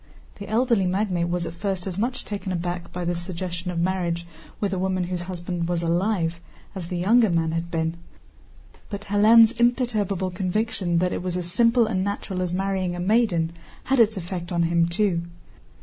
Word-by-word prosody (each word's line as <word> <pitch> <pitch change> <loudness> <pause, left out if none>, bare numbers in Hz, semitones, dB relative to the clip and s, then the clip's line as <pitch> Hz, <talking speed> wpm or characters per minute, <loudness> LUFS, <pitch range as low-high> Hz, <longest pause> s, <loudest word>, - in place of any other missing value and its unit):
The 200 - -7
elderly 225 -3 +2
magnate 180 -2 0
was 175 0 -1
at 165 - -5
first 190 0 -3
as 190 -3 -3
much 250 +3 -1
taken 200 -2 -4
aback 175 0 -3
by 180 -1 -4
this 175 0 -1
suggestion 175 0 -4
of 175 - -3
marriage 170 -1 0 0.3
with 200 -2 -1
a 185 - -1
woman 185 -1 0
whose 180 0 -3
husband 175 -1 -4
was 170 -1 0
alive, 170 -1 0 0.3
as 185 -4 -6
the 180 - -3
younger 220 +5 +4
man 165 -2 +1
had 165 +1 -2
been, 165 0 -1 0.9
but 200 -1 -5
Hélène's 215 +2 +6
imperturbable 215 -6 +1
conviction 185 -1 -1
that 180 +1 +1
it - - -2
was 180 0 -2
as 175 -1 -4
simple 235 +2 +4
and 190 -4 -1
natural 200 -2 -3
as 180 -1 -1
marrying 190 -1 -1
a - - -5
maiden 185 -4 +2 0.3
had 270 0 +1
its 220 -2 +4
effect 175 -1 -5
on 170 -1 +2
him 170 0 +2
too. 175 -1 +1
185 Hz, 185 wpm, -24 LUFS, 175-205 Hz, 0.9 s, Hélène's